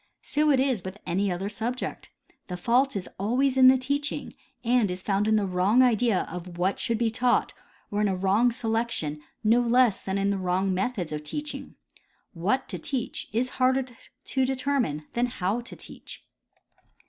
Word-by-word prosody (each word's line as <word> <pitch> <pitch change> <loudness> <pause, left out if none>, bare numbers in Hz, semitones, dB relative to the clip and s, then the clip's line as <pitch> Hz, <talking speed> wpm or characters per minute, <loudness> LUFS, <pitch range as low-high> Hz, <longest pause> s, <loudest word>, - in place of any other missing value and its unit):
So 300 +1 +1
is 265 -4 +3
it 180 - -18
with 190 +1 -6
any 195 +3 0
other 180 +3 -2
subject. 225 +5 -4 0.4
The 180 - -5
fault 245 +8 +2
is 190 -2 -3
always 255 +7 +1
in 260 -1 +7
the 260 0 +7
teaching, 280 +3 -2 0.3
and 235 -3 +3
is 180 +1 -5
found 200 +1 +1
in 220 - +4
the 210 -2 +2
wrong 190 +7 +3
idea 235 -4 +3
of 175 0 -7
what 185 +3 0
should 230 -2 0
be 230 -1 +1
taught 245 +1 +1 0.4
or 205 0 0
in 210 - +3
a 190 - 0
wrong 195 +6 +3
selection 225 -10 -2 0.2
no 230 +3 +4
less 240 -2 +3
than 190 0 -2
in 200 0 +1
the 200 - -1
wrong 185 +1 0
methods 190 -3 -2
of 150 0 -3
teaching. 295 - -6 0.6
What 200 +10 0
to - - -5
teach 280 -6 -3
is 240 +4 0
harder 260 +1 +3 0.4
to 265 - 0
determine 255 - 0
than 240 +1 +1
how 205 -1 -1
to 240 - -10
teach. - - -11
225 Hz, 180 wpm, -27 LUFS, 190-255 Hz, 0.6 s, in